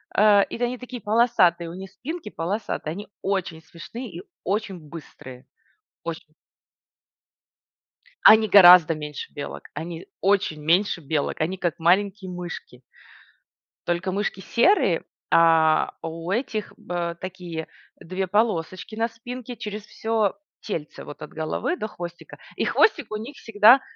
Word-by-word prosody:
э, 205 Hz, -1 st, +6 dB
и -, -, -7 dB
тэ 245 Hz, -, +1 dB
они 250 Hz, +1 st, -3 dB
такие 250 Hz, -1 st, -8 dB
полосатые, 210 Hz, -6 st, +3 dB
у 170 Hz, -, -8 dB
них 190 Hz, +1 st, -9 dB
спинки 300 Hz, -, -6 dB
полосатые, 180 Hz, -3 st, -3 dB
они 205 Hz, +6 st, -7 dB
очень 185 Hz, -5 st, -2 dB
смешные 195 Hz, -, -9 dB
и 175 Hz, +1 st, -8 dB, 0.2 s
очень 195 Hz, -1 st, -2 dB
быстрые. 145 Hz, -5 st, -11 dB, 0.6 s
Оче -, -, -5 dB, 2.0 s
Они 220 Hz, 0 st, +8 dB
гораздо 180 Hz, -4 st, +9 dB
меньше 150 Hz, -2 st, -7 dB
белок, 145 Hz, -, -6 dB
они 165 Hz, +2 st, -6 dB
очень 195 Hz, -6 st, +1 dB
меньше 175 Hz, +4 st, +2 dB
белок, 145 Hz, 0 st, -2 dB
они 180 Hz, +5 st, -1 dB
как 175 Hz, -4 st, -2 dB
маленькие 190 Hz, +3 st, +2 dB
мышки. 175 Hz, -8 st, -7 dB, 1.1 s
Только 175 Hz, +2 st, -1 dB
мышки 200 Hz, 0 st, -2 dB
серые, 240 Hz, -, +3 dB, 0.3 s
а 165 Hz, -1 st, +4 dB
у 165 Hz, +2 st, -5 dB
этих 220 Hz, -2 st, -2 dB
б 170 Hz, -1 st, -3 dB
такие 175 Hz, -3 st, -6 dB, 0.3 s
2 185 Hz, +2 st, -3 dB
полосочки 185 Hz, -1 st, -1 dB
на 225 Hz, +1 st, +1 dB
спинке 245 Hz, +1 st, -8 dB
через 210 Hz, -1 st, -6 dB
всё 220 Hz, -3 st, 0 dB, 0.3 s
тельце 160 Hz, -8 st, -5 dB
вот 145 Hz, -, -10 dB
от 150 Hz, -, -8 dB
головы 160 Hz, -, -2 dB
до 215 Hz, -, -4 dB
хвостика 175 Hz, -3 st, -9 dB, 0.2 s
и -, -, -1 dB
хвостик 330 Hz, -, +3 dB
у 215 Hz, -, -2 dB
них 235 Hz, +7 st, -8 dB
всегда, 225 Hz, +4 st, +6 dB
190 Hz, 135 wpm, -24 LUFS, 165-220 Hz, 2.0 s, гораздо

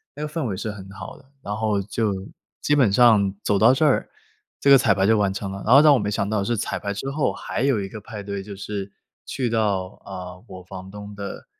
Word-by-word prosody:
那 150 Hz, -, -5 dB
个 -, -, -3 dB
氛 160 Hz, -5 st, -2 dB
围 95 Hz, -4 st, -3 dB
是 110 Hz, +2 st, -3 dB
很 95 Hz, -2 st, -10 dB
好 95 Hz, -, -9 dB
的， -, -, -19 dB, 0.2 s
然 105 Hz, -, -3 dB
后 110 Hz, -2 st, 0 dB
就 110 Hz, +1 st, -1 dB, 0.5 s
基 145 Hz, -, +1 dB
本 130 Hz, -8 st, +4 dB
上 105 Hz, -3 st, +4 dB
走 100 Hz, -, +1 dB
到 110 Hz, +3 st, +7 dB
这 135 Hz, +4 st, +2 dB
儿， 145 Hz, -, +2 dB, 0.5 s
这 140 Hz, -, +4 dB
个 135 Hz, -, +9 dB
彩 105 Hz, -5 st, +3 dB
排 95 Hz, -, +2 dB
就 110 Hz, +2 st, +4 dB
完 100 Hz, -2 st, +2 dB
成 100 Hz, 0 st, -4 dB
了， 100 Hz, -, -6 dB
然 120 Hz, -, +5 dB
后 -, -, +10 dB
让 150 Hz, -2 st, +7 dB
我 130 Hz, -, +3 dB
没 105 Hz, -, -2 dB
想 100 Hz, -1 st, -1 dB
到 105 Hz, -2 st, 0 dB
是 120 Hz, +3 st, -1 dB
彩 95 Hz, -2 st, -2 dB
排 100 Hz, -, -3 dB
之 100 Hz, +7 st, -4 dB
后 145 Hz, 0 st, 0 dB
还 -, -, -5 dB
有 135 Hz, -4 st, +2 dB
一 95 Hz, -, -3 dB
个 110 Hz, +1 st, -9 dB
派 105 Hz, -1 st, -8 dB
对 100 Hz, 0 st, -4 dB
就 100 Hz, 0 st, -9 dB
是， 100 Hz, 0 st, -5 dB, 0.4 s
去 130 Hz, -3 st, -2 dB
到， 105 Hz, -5 st, 0 dB, 0.2 s
啊， 90 Hz, -1 st, -8 dB
我 95 Hz, -1 st, -10 dB
房 95 Hz, +1 st, -9 dB
东 105 Hz, +1 st, -9 dB
的 100 Hz, -1 st, -7 dB
105 Hz, 275 characters per minute, -23 LUFS, 100-115 Hz, 0.5 s, 后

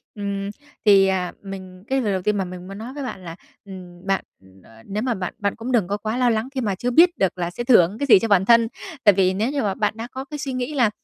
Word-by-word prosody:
Ừm, 200 Hz, -1 st, -3 dB, 0.4 s
thì, 195 Hz, -2 st, +6 dB
à, 185 Hz, -2 st, -1 dB
mình 185 Hz, -2 st, -9 dB
cái 270 Hz, 0 st, +1 dB
lời 210 Hz, -5 st, 0 dB
đầu 190 Hz, -, -1 dB
tiên 210 Hz, +2 st, 0 dB
mà 195 Hz, -, 0 dB
mình 180 Hz, 0 st, -9 dB
muốn 195 Hz, +1 st, -8 dB
nói 230 Hz, +5 st, -7 dB
với 285 Hz, 0 st, -6 dB
bạn 220 Hz, -7 st, -6 dB
là, 165 Hz, -1 st, -7 dB, 0.3 s
ừm, 180 Hz, -2 st, -11 dB
bạn 195 Hz, 0 st, +1 dB, 0.6 s
nếu 210 Hz, +3 st, -3 dB
mà 250 Hz, -2 st, 0 dB
bạn 185 Hz, -4 st, -4 dB
bạn 200 Hz, -1 st, -1 dB
cũng 230 Hz, +3 st, -5 dB
đừng 225 Hz, -8 st, +2 dB
có 200 Hz, +2 st, -2 dB
quá 215 Hz, +3 st, -3 dB
lo 250 Hz, -1 st, +3 dB
lắng 225 Hz, +1 st, 0 dB
khi 260 Hz, -, -1 dB
mà 205 Hz, -5 st, -1 dB
chưa 245 Hz, +6 st, -2 dB
biết 340 Hz, +7 st, +5 dB
được 190 Hz, -1 st, 0 dB
là 175 Hz, -1 st, -2 dB
sẽ 210 Hz, +7 st, -5 dB
thưởng 210 Hz, -6 st, +4 dB
cái 285 Hz, -, 0 dB
gì 225 Hz, -, +8 dB
cho 225 Hz, -, -1 dB
bản 195 Hz, -3 st, +3 dB
thân. 230 Hz, +1 st, +5 dB, 0.4 s
Tại 205 Hz, -3 st, +7 dB
vì 185 Hz, -1 st, +2 dB
nếu 215 Hz, +7 st, -1 dB
như 285 Hz, -1 st, -1 dB
mà 200 Hz, -3 st, 0 dB
bạn 210 Hz, +1 st, 0 dB
đã 230 Hz, +1 st, -5 dB
có 265 Hz, +1 st, -6 dB
cái 295 Hz, +2 st, -7 dB
suy 275 Hz, -2 st, -4 dB
nghĩ 255 Hz, +3 st, -3 dB
là, 245 Hz, -6 st, +3 dB
205 Hz, 285 wpm, -22 LUFS, 190-245 Hz, 0.6 s, gì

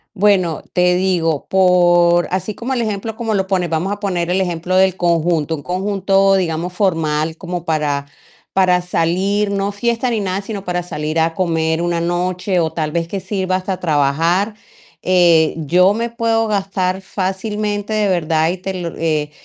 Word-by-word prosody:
Bueno, 185 Hz, -5 st, +2 dB
te 180 Hz, 0 st, +3 dB
digo, 175 Hz, -5 st, 0 dB
por 175 Hz, -2 st, +4 dB
así 190 Hz, +3 st, -2 dB
como 260 Hz, +3 st, -3 dB
el 240 Hz, -, 0 dB
ejemplo 215 Hz, +1 st, -3 dB
como 225 Hz, -2 st, -2 dB
lo 190 Hz, -2 st, 0 dB
pones, 180 Hz, -3 st, 0 dB
vamos 165 Hz, +5 st, -1 dB
a -, -, -12 dB
poner 180 Hz, -4 st, -1 dB
ejemplo 180 Hz, -1 st, -1 dB
del 190 Hz, -1 st, +4 dB
conjunto, 165 Hz, -2 st, +1 dB
un 145 Hz, -, -6 dB
conjunto, 195 Hz, +2 st, +1 dB
digamos, 175 Hz, -1 st, -1 dB
formal, 160 Hz, -4 st, 0 dB
como 175 Hz, -2 st, -5 dB
para 150 Hz, -3 st, -1 dB, 0.5 s
para 180 Hz, -2 st, +3 dB
salir, 190 Hz, +4 st, 0 dB
no 200 Hz, 0 st, -1 dB
fiesta 235 Hz, +4 st, -1 dB
ni 225 Hz, -2 st, 0 dB
nada, 195 Hz, 0 st, -2 dB
sino 200 Hz, -1 st, -6 dB
para 180 Hz, 0 st, -1 dB
salir 155 Hz, -1 st, -4 dB
a 165 Hz, 0 st, +2 dB
comer 165 Hz, -2 st, 0 dB
una 170 Hz, -1 st, -1 dB
noche, 180 Hz, +1 st, -1 dB
o 160 Hz, -1 st, 0 dB
tal 155 Hz, -2 st, -2 dB
vez 165 Hz, -1 st, -1 dB
que 195 Hz, -, -3 dB
sirva 185 Hz, -2 st, -1 dB
hasta 185 Hz, 0 st, -4 dB
trabajar, 165 Hz, +7 st, +1 dB, 0.5 s
eh, 175 Hz, -3 st, +4 dB
yo 180 Hz, +6 st, +3 dB
me 230 Hz, +1 st, -2 dB
puedo 230 Hz, -1 st, 0 dB
gastar 190 Hz, -2 st, -1 dB
fácilmente, 205 Hz, +2 st, -3 dB
de 210 Hz, -2 st, +1 dB
verdad, 160 Hz, -2 st, +1 dB
y 185 Hz, -, -4 dB
te 190 Hz, +1 st, -5 dB
lo 170 Hz, -2 st, -5 dB
eh, 155 Hz, -2 st, -1 dB
180 Hz, 170 wpm, -18 LUFS, 165-195 Hz, 0.5 s, por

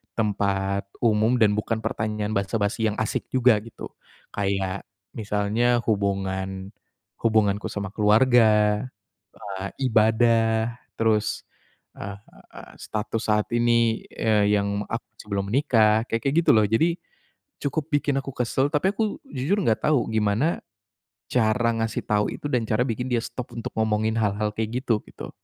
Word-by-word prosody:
tempat 100 Hz, -2 st, 0 dB, 0.2 s
umum 110 Hz, +2 st, +3 dB
dan 105 Hz, -1 st, +5 dB
bukan 110 Hz, +1 st, -1 dB
pertanyaan 105 Hz, -1 st, -2 dB
basa-basi 100 Hz, +2 st, 0 dB
yang -, -, -5 dB
asik 110 Hz, -, -2 dB
juga, 125 Hz, -3 st, +5 dB
gitu. 115 Hz, -, -9 dB, 0.5 s
Kayak, 100 Hz, -1 st, -2 dB, 0.3 s
misalnya 110 Hz, +3 st, +1 dB
hubungan 95 Hz, -2 st, -1 dB, 0.5 s
hubunganku 110 Hz, -2 st, +2 dB
sama 100 Hz, -2 st, -4 dB
keluarga, 105 Hz, -1 st, +4 dB, 0.8 s
eee, 95 Hz, +1 st, -4 dB, 0.2 s
ibadah, 110 Hz, +1 st, +2 dB, 0.2 s
terus, 110 Hz, -1 st, +1 dB, 0.5 s
eee, 100 Hz, 0 st, -6 dB, 0.7 s
status 110 Hz, +1 st, -3 dB
saat 105 Hz, 0 st, +2 dB
ini, 115 Hz, -1 st, +2 dB
eee, 105 Hz, -2 st, +2 dB
yang 100 Hz, 0 st, -2 dB
aku 115 Hz, -, -3 dB, 0.2 s
sebelum 100 Hz, -2 st, -3 dB
menikah, 110 Hz, -5 st, +3 dB
kayak-kayak 135 Hz, +6 st, -1 dB
gitu -, -, +4 dB
loh. 110 Hz, -, +5 dB
Jadi, 135 Hz, +11 st, +2 dB, 0.7 s
cukup 145 Hz, +2 st, -2 dB
bikin 145 Hz, -1 st, +1 dB
aku 135 Hz, -, -8 dB
kesel, 130 Hz, +3 st, +1 dB
tapi 190 Hz, +7 st, +2 dB
aku, 215 Hz, 0 st, -1 dB
jujur 145 Hz, +9 st, -1 dB
enggak 115 Hz, -, +1 dB
tahu, 145 Hz, -6 st, +3 dB
gimana 110 Hz, +9 st, +1 dB, 0.7 s
cara 115 Hz, 0 st, +2 dB
ngasih 115 Hz, 0 st, -2 dB
tahu 105 Hz, 0 st, 0 dB
itu, -, -, -6 dB
dan 120 Hz, -3 st, +1 dB
cara 110 Hz, +2 st, +1 dB
bikin 125 Hz, +2 st, -3 dB
dia 120 Hz, -, +2 dB
stop 125 Hz, -, -7 dB
untuk 115 Hz, -, -4 dB
ngomongin 110 Hz, 0 st, +1 dB
hal-hal 105 Hz, 0 st, 0 dB
kayak 110 Hz, +3 st, -2 dB
gitu, 115 Hz, -5 st, +1 dB
gitu. -, -, -9 dB
110 Hz, 135 wpm, -24 LUFS, 105-120 Hz, 0.8 s, dan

